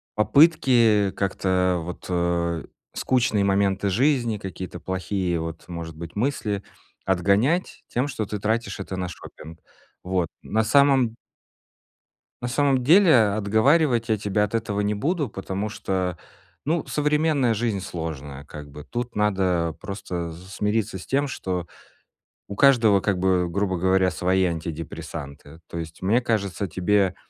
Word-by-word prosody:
попытки 120 - +4
как-то 90 -2 0
вот, 85 +2 -8
э, 85 -2 0 0.3
скучные 120 -6 +1
моменты 100 0 +1
жизни, 120 0 +2
какие-то 95 -2 -7
плохие 95 -2 -2
вот, 80 0 -6
может 85 -2 -6
быть, 85 0 -9
мысли 105 -5 -1 0.4
отгонять 100 - +1
тем, 125 +4 -1
что 115 -5 -3
ты 105 +1 -5
тратишь 110 -1 -1
это 95 -1 -5
на 90 - -2
шопинг? 80 -2 -11 0.4
Вот. 90 -2 0
На 110 +1 0
самом 135 -2 +4 1.3
на 120 - -2
самом 135 0 +2
деле, 170 +3 +6 0.2
отговаривать 115 +4 +2
я 110 - +2
тебя 105 0 0
от 105 - -3
этого 110 -3 -1
не 105 +1 0
буду, 145 - -1
потому 95 0 -4
что, 95 -4 -2 0.5
ну, 160 +2 0
современная 150 -4 +1
жизнь 110 -2 -1
сложная, 75 -6 -6
как 75 -1 -10
бы. 75 +1 -10
Тут 120 +6 -5
надо 95 -5 +1
просто 90 -4 -5
смириться 95 +3 -2
с - - -10
тем, 140 +2 +1
что 90 -9 -4 0.8
у 100 - -6
каждого, 115 -7 +5
как 95 -2 0
бы, 90 -2 +2
грубо 95 0 -1
говоря, 95 +1 +3
свои 95 +1 +1
антидепрессанты. 80 -2 -6
То - - -7
есть, 80 -1 -7
мне 110 +7 +2
кажется, 100 -5 -1
тебе 95 +2 +1
100 Hz, 135 wpm, -24 LUFS, 90-115 Hz, 1.3 s, деле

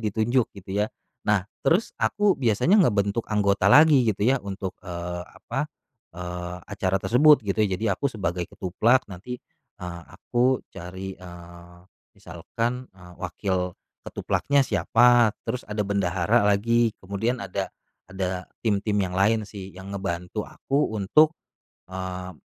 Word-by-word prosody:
ditunjuk 115 +4 +1
gitu 95 0 -11
ya, 105 +2 +1 0.4
nah 105 -3 +3 0.2
terus 185 +7 +2
aku 205 -1 +3
biasanya 140 - +3
ngebentuk 105 - +1
anggota 100 -2 +2
lagi 145 -2 +7
gitu 100 0 0
ya 130 +2 +3
untuk, 95 -1 -5
eee, 90 -1 -5
apa 135 +6 -4 0.5
eee, 90 0 -5
acara 95 -2 -1
tersebut 140 +5 +5
gitu 100 +1 -1
ya 95 -3 +2
jadi 110 - -5
aku 140 +9 -1
sebagai 90 -7 -3
ketuplak 115 +8 +1
nanti, 100 +7 -7 0.4
eee, 85 -1 -7
aku 125 +1 0
cari, 95 +2 -7
eee, 85 0 -12 0.4
misalkan, 115 +9 -4
eee, 90 -1 -14
wakil 90 0 -2 0.3
ketuplaknya 140 -1 +1
siapa 120 -4 +4
terus 125 -4 -4
ada 105 0 -1
bendahara 100 +2 +1
lagi 115 +3 +2
kemudian 105 +5 -2
ada 95 - -3 0.4
ada 95 -1 -3 0.2
tim-tim 105 -1 +1
yang 90 - -5
lain 105 +4 +2
sih 100 -2 -9
yang 95 +2 -9
ngebantu 95 +1 -4
aku 135 -5 -1
untuk 155 - +4 0.6
eee, 95 0 -5
100 Hz, 135 wpm, -25 LUFS, 90-120 Hz, 0.6 s, lagi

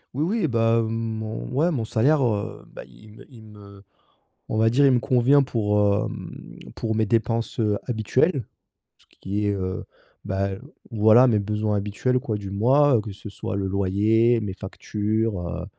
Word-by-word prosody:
Oui, 145 - 0 0.2
oui 160 - +2
bah, 115 -2 +2
mon 110 -1 -4
ouais 145 +7 +1
mon 125 -10 -2
salaire, 135 +6 +2
heu, 105 -3 -3
bah, - - -9
il 65 - -17
me - - -14
il 115 -3 -14
me, 100 -2 -15 0.7
on - - -3
va 110 +1 +3
dire 140 +4 +4
il 135 - +5
me 125 - +3
convient 130 +2 +3
pour, 105 -5 0 0.3
hem, - - -10 0.2
pour 110 -1 -3
mes 110 0 +1
dépenses, 115 +1 -1
heu, 105 -2 +1
habituelles, 130 - 0 0.5
ce - - -29
qui 100 +2 -3
est, - - +2
heu, 95 -1 -4 0.4
bah, 100 +1 -1 0.4
voilà 110 +4 +6
mes 110 -4 +2
besoins 105 +1 -1
habituels 105 +6 -1
quoi 115 -6 -3
du 100 -2 -7
mois, 135 +7 +3
heu, - - 0
que 105 0 -8
ce 105 - -10
soit 100 -1 -5
le 95 -1 -2
loyer, 105 +5 +2
mes 100 -3 -4
factures, 105 +1 -3
heu 85 0 -5
110 Hz, 180 wpm, -23 LUFS, 105-120 Hz, 0.7 s, voilà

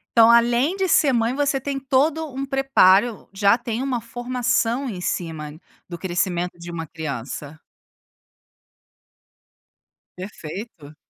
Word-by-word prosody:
Então 230 -1 +7
além 240 +7 +4
de 385 -1 0
ser 290 -6 +4
mãe 230 +1 +1
você 280 -2 0
tem 275 0 -3
todo 285 +4 +1
um 270 +1 -3
preparo, 245 -6 +3
já 200 +3 +3
tem 235 0 -4
uma 255 -3 -2
formação 245 +2 -1
em 185 -4 -6
cima 160 -4 -4 0.3
do 175 - -7
crescimento 175 0 -2
de 170 0 -8
um - - -7 0.2
criança? 145 -1 -6 2.6
Perfeito. 180 -4 -9
230 Hz, 120 wpm, -22 LUFS, 175-265 Hz, 2.6 s, Então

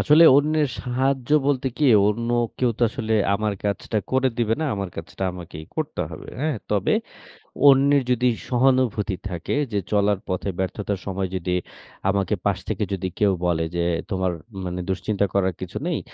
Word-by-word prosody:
আসলে 155 +2 +6
অন্যের 150 0 +2
সাহায্য 130 0 0 0.2
বলতে 135 -2 +1
কি। 150 - +1 0.2
অন্য 115 +3 -1 0.3
কেউ 125 -2 +2
তো - - -1
আসলে 110 -1 -3 0.2
আমার 105 +1 0
কাজটা 105 +1 -1
করে 130 0 +3
দিবে 115 -2 +2
না। - - 0
আমার 100 -1 -3
কাজটা 80 +3 -7
আমাকেই 85 -3 -9
করতে - - -2
হবে, - - -9
হ্যাঁ? 155 -2 0
তবে 105 -2 +2 0.8
অন্যের 140 0 +5
যদি 125 +1 +2 0.2
সহানুভূতি 125 -5 +2
থাকে 85 - -3 0.2
যে 105 - +1
চলার 100 -1 +2
পথে 95 +1 -2
ব্যর্থতার 100 +1 -2
সময় 95 -1 -2
যদি 90 0 -1 0.5
আমাকে 100 -2 +1
পাশ - - +2
থেকে - - -1
যদি 95 -1 -2
কেউ 105 -2 +4
বলে। 85 -2 +1
যে 85 - +1 0.3
তোমার 95 -1 0 0.3
মানে 90 0 -3
দুশ্চিন্তা 100 +1 0
করার 95 -2 +2
কিছু - - -5
নেই, - - 0
105 Hz, 165 wpm, -23 LUFS, 95-130 Hz, 0.8 s, আসলে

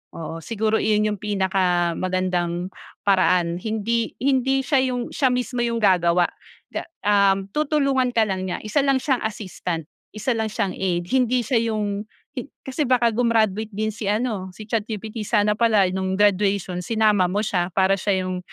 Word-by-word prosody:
oo. 165 0 -6
Siguro 220 +3 0
'yon 210 -1 +2
yung 205 - -5
pinakamagandang 185 -2 0 0.3
paraan 180 -3 +2
hindi 220 +2 -1
hindi 270 +1 +1
siya 275 0 +2 0.2
yung 240 -1 -4
siya 270 - +2
mismo 250 0 -1
yung 235 -1 0
gagawa 175 -3 +4 0.4
ga - - -5 0.2
um, 200 -1 +3
tutulungan 275 -4 +1
ka 225 - +5
lang 190 -3 -2
niya, 185 - -4
isa 215 +7 0
lang 275 -1 +3
siyang 265 -2 0
assistant, 185 -5 -5 0.3
isa 215 +4 -1
lang 225 -1 0
siyang 200 -2 -2
aid. 180 -2 -1
Hindi 255 -1 +2
siya 230 +1 +1
yung 210 -1 -2 0.2
hi 265 -1 -6 0.2
kasi 270 +2 -2
baka 240 -2 +3
grumaduate 220 -2 +1
din 215 +1 -1
si 210 -1 -6
ano 210 -2 -1
si 215 - -9
ChatGPT 215 0 -3
sana 210 -2 +3
pala 215 -1 +3
no'ng 190 0 -1
graduation 200 -2 +1
sinama 210 -1 +2
mo 205 +4 -1
siya 180 -4 0
para 195 0 +3
siya 190 -2 0
yung 185 0 -3
210 Hz, 160 wpm, -23 LUFS, 185-235 Hz, 0.4 s, ka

